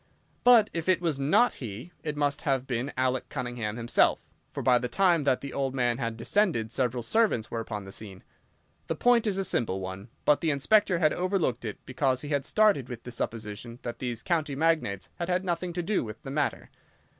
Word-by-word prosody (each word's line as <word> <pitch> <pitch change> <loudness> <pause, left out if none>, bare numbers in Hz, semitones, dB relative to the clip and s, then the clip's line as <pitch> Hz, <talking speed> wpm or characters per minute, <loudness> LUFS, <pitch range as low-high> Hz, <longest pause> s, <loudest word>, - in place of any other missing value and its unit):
But 235 -4 +6
if 165 +1 -2
it 185 - +4
was 165 -5 -1
not 150 - +4
he, 120 - -7
it 150 -2 -3
must 145 -1 0
have 135 -4 0
been 125 +2 -2
Alec 130 0 0
Cunningham 120 -5 -4
himself, 120 0 +2 0.3
for - - -5
by 125 -2 +5
the 125 - -2
time 175 0 +2
that 130 -2 +2
the 140 -1 -6
old 135 -1 -1
man 120 -1 +1
had 115 -2 -3
descended 120 - +1
several 125 -1 -1
servants 120 - +1
were 115 - -2
upon 105 -3 -5
the 95 - -9
scene. 100 -2 -8 0.6
The 165 - -1
point 235 +5 +3
is 195 -2 0
a 195 - -1
simple 110 - -1
one, 95 +3 -7 0.2
but 150 - +4
the 165 - +1
Inspector 180 +6 +3
had 155 -3 +3
overlooked 175 - 0
it 105 - -4
because 130 0 0
he 145 - -6
had 140 -2 0
started 210 - +3
with 120 -2 -7
the 125 - -8
supposition 115 0 -5
that 120 -1 -5
these 120 -3 -4
county 155 -5 0
magnates 155 -11 0
had 170 +1 -3
had 180 +1 0
nothing 175 0 -1
to 175 0 -2
do 200 +3 0
with 110 -2 -8
the 135 - -6
matter. 145 0 -2
135 Hz, 210 wpm, -28 LUFS, 120-170 Hz, 0.6 s, But